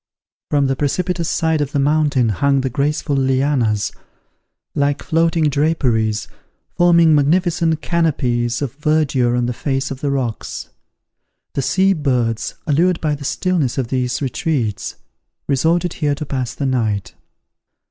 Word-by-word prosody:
From 145 -1 +2
the 135 0 +1
precipitous 170 +5 -1
side 160 -2 +1
of 145 0 -3
the 145 - +1
mountain 145 -4 +2
hung 140 +7 +2
the 130 -1 -2
graceful 145 +2 0
lianas, 130 -5 +1 0.8
like 145 0 0
floating 165 0 +1
draperies, 130 -8 +1 0.5
forming 170 -2 +5
magnificent 160 +1 +2
canopies 125 -7 0
of 135 - -4
verdure 145 -5 +1
on 120 - +1
the 125 - -1
face 135 +2 -2
of 135 - -6
the 145 - 0
rocks. 130 -5 -3 0.8
The - - -1
sea 190 +8 +2
birds, 125 - -1
allured 165 +4 +2
by 155 -2 0
the 145 0 -6
stillness 165 -5 0
of 130 -4 -1
these 125 +1 -1
retreats, 130 -5 -2 0.5
resorted 165 +5 +1
here 145 -2 0
to 150 - -5
pass 130 -4 -3
the 140 - -3
night. 110 -7 -1
140 Hz, 135 wpm, -19 LUFS, 125-160 Hz, 0.8 s, forming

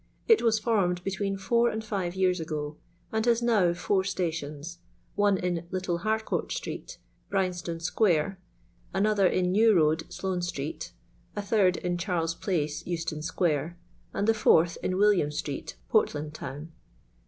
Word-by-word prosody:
It 450 -2 +6
was 225 -2 +3
formed 195 -6 +1
between 195 +1 -2
four 235 +5 +2
and 220 0 -4
five 190 -4 -2
years 185 -1 +2
ago, 155 -2 -4 0.4
and 220 0 0
has 235 0 +3
now 210 -7 +4
four 190 +2 +1
stations: 165 -3 -3 0.3
one 205 -1 +3
in 175 -2 -2
Little 185 -2 -2
Harcourt 220 +3 -1
street, - - -5 0.3
Bryanstone 180 -3 -1
square; 180 0 +1 0.6
an 195 +2 +3
other 205 -3 +4
in 180 0 +1
New 215 +2 +5
road, 160 -1 +2
Sloane 185 -2 -2
street; 155 -4 -4 0.4
a 205 - -1
third 200 -3 +3
in 175 -1 -2
Charles 170 -3 -1
place, 155 -5 -2
Euston 165 -3 -3
square; 160 0 -1 0.3
and 205 - -1
the 225 - +5
fourth 170 -6 +4
in 185 - -1
William 200 -7 +4
street, 145 -1 -5
Portland 150 0 +1
town. 150 +3 -7
180 Hz, 150 wpm, -28 LUFS, 165-205 Hz, 0.6 s, It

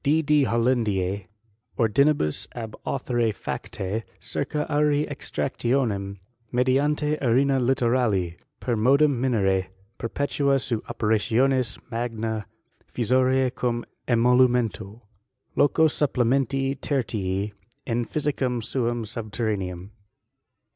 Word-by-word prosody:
D.D. 150 -1 +3
Hollandise 110 -6 +1 0.5
ordinibus 115 - +2
ab 110 -3 -6
authore 120 -4 0
fades, 100 +1 -4 0.2
circa 150 +2 -2
auri 150 0 +2
extractionem 120 -7 -2 0.3
mediante 145 +4 +1
arena 135 +2 +3
littorali 120 -8 +1 0.2
per 120 - -1
modum 135 +3 +3
mbem 95 -7 +1 0.3
perpetute 140 +3 0
seu 120 -4 -2
operationis 120 +3 +1
ma^« 115 -2 -2 0.5
nisorise 130 +2 +2
cum 120 -1 -1 0.2
emolumento. 120 -4 +2 0.5
Loco 160 +2 +4
supplementi 135 -1 +1
tertii 105 -7 -2 0.3
in 120 -1 0
Physicam 130 -3 -1
suam 120 0 -1
subterraneam. 105 -4 -4
120 Hz, 85 wpm, -25 LUFS, 110-135 Hz, 0.5 s, Loco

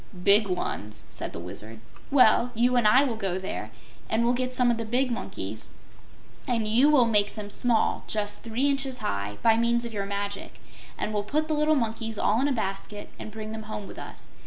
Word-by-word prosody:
"Big 205 +2 +6
ones," 105 - -4
said - - -5
the - - -8
Wizard. 100 +6 -7 0.3
"Well, 250 -2 +5
you 245 +2 +3
and 240 -3 +4
I 255 +6 +6
will 250 -5 -1
go 195 -4 -2
there, 190 0 -5 0.4
and 225 +1 +1
we'll 240 - +3
get 255 0 -1
some 250 -1 +4
of 235 - 0
the 230 - -3
big 250 +3 0
monkeys, 235 - -5 0.7
and 230 -3 0
you 245 +7 +5
will 280 -5 +5
make 210 -3 +2
them 205 -2 -6
small 235 -1 +2
just 205 -1 -2
three 235 +5 0
inches 270 -2 0
high 100 - -3
by 225 -1 +5
means 235 +1 +2
of 235 - -6
your 200 -1 -3
magic, 200 0 -5 0.4
and 215 - -3
we'll 205 - +1
put 300 +9 -1
the 315 - 0
little 305 +1 +3
monkeys 225 -3 -2
all 220 +4 +2
in 280 - +2
a - - 0
basket 205 -3 -4
and - - -6
bring 215 0 -7
them 220 -1 -7
home 210 -1 -5
with - - -10
us. - - -10
225 Hz, 210 wpm, -27 LUFS, 205-245 Hz, 0.7 s, Big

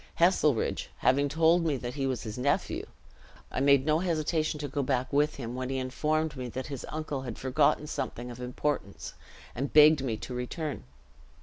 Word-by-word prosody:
Heselrigge 160 -8 +2
having 140 +2 +2
told 165 +3 +4
me 155 -4 +1
that 120 0 -5
he 135 -2 -1
was 130 -3 -2
his 110 -2 -5
nephew, 135 +3 -1 0.6
I - - -2
made 140 0 +4
no 155 +1 +3
hesitation 155 -3 0
to 145 - -3
go 140 +1 -2
back 130 0 -1
with 150 +2 +2
him, 120 -3 -6
when 130 0 -4
he 135 - -1
informed 150 +4 -1
me 125 -2 -5
that 130 +3 -5
his 140 -3 -6
uncle 155 -3 -4
had 120 -4 -6
forgotten 140 +3 +2
something 125 -4 -4
of 120 - -10
importance, 125 -4 -3 0.4
and 135 +3 -3
begged 150 -1 +7
me 115 -5 -1
to 125 - -7
return. 125 - -4
140 Hz, 185 wpm, -29 LUFS, 125-155 Hz, 0.6 s, begged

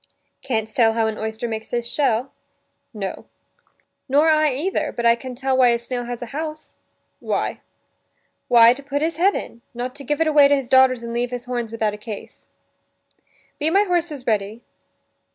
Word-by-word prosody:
"Canst 220 -4 -3
tell 225 -2 +4
how 225 0 +1
an 220 -1 -3
oyster 220 +2 -4
makes 220 -1 -5
his 240 -1 -1
shell?" 255 -1 0 0.6
"No." 200 -5 -6 0.8
"Nor 295 +4 +4
I 310 -1 +3
either; 345 +8 -1
but 235 - -4
I 235 - +7
can 250 +1 -7
tell 265 +1 0
why 255 -1 +5
a 235 - +3
snail 245 +1 -5
has 245 0 -5
a 240 - -10
house." 310 +1 -6 0.5
"Why?" - - -2 0.9
"Why, 235 0 +7
to 270 - -11
put 285 +1 -2
his 325 -1 -1
head 385 +4 +3
in; 235 - -6
not 250 +1 -4
to 280 - -11
give 295 +2 -2
it 325 - +3
away 295 -2 +6
to 285 - +4
his 270 -3 -4
daughters 260 -2 +4
and 235 0 -5
leave 240 +1 -1
his 245 -1 -6
horns 240 -3 -3
without 220 -2 -1
a - - -7
case." 210 -1 -9 0.6
" - - -36
Be 305 +1 +1
my 395 +5 +4
horses 340 -8 -2
ready?" 215 +1 -1
245 Hz, 190 wpm, -22 LUFS, 230-285 Hz, 0.9 s, I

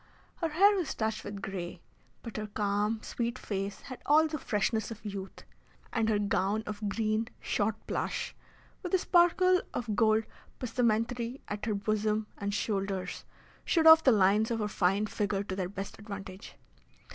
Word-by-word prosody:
Her 330 - -1
hair 395 +7 +5
was 330 -7 -2
touched 220 0 -2
with 205 0 -7
grey, 180 -2 -5 0.4
but 230 -2 -7
her 215 0 -3
calm, 210 +1 -1
sweet 235 +1 -3
face 200 -3 -4
had 255 -2 -9
all 310 +2 +6
the 310 -1 -4
freshness 215 -1 0
of 225 -1 -9
youth, 195 -2 -6 0.5
and 225 -2 +1
her 215 - +3
gown 205 +1 0
of 210 0 -4
green 215 +1 0
shot 210 +1 0
plush, - - -3 0.5
with 365 0 0
a - - +6
sparkle 365 +1 +4
of 225 -4 -2
gold 220 -1 +4 0.4
passementerie 235 +1 0
at 205 +2 -4
her 215 - +1
bosom 215 +1 0
and 200 -1 -2
shoulders, 195 -3 -2 0.4
showed 325 -2 +2
off 320 0 +10
the 265 - +6
lines 210 +1 +4
of 230 - 0
her 210 -2 -1
fine 195 +1 +1
figure 205 -1 -1
to 190 -2 -5
their 185 -2 -2
best 195 0 -7
advantage. 200 -2 -8
215 Hz, 165 wpm, -30 LUFS, 200-235 Hz, 0.5 s, off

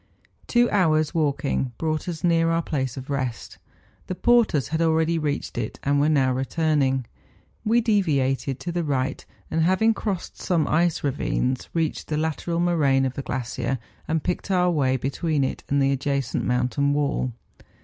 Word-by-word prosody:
Two 240 0 +4
hours' 155 -6 +2
walking 140 -5 0
brought 155 +1 -2
us 165 -3 -6
near 165 -1 +3
our 165 0 +1
place 130 -5 -2
of 130 +2 -6
rest; 130 -4 -3 0.5
the 185 - -3
porters 210 - +3
had 160 +1 -1
already 160 0 +2
reached 145 -2 -2
it, - - -4
and 140 +1 +2
were 150 - +3
now 135 -4 +3
returning. 135 -1 +1 0.6
We 230 +2 +3
deviated 140 - +1
to 175 - -3
the 170 0 -1
right, 135 -3 -1 0.3
and 160 - +1
having 190 +7 +3
crossed 200 -4 -4
some 165 -5 +1
ice 170 +1 +1
ravines, 130 -2 -1
reached 165 -2 -1
the 150 - -1
lateral 160 +2 -1
moraine 145 -6 +3
of 130 - -2
the 140 - -4
glacier, 125 0 -3 0.3
and 160 -1 0
picked 180 +2 -2
our 180 -2 +3
way 130 -5 +2
between 140 +3 -1
it 130 - -3
and 140 - +2
the 135 0 +3
adjacent 140 -2 -1
mountain 125 +3 +1
wall. 140 -3 0
150 Hz, 165 wpm, -24 LUFS, 135-170 Hz, 0.6 s, Two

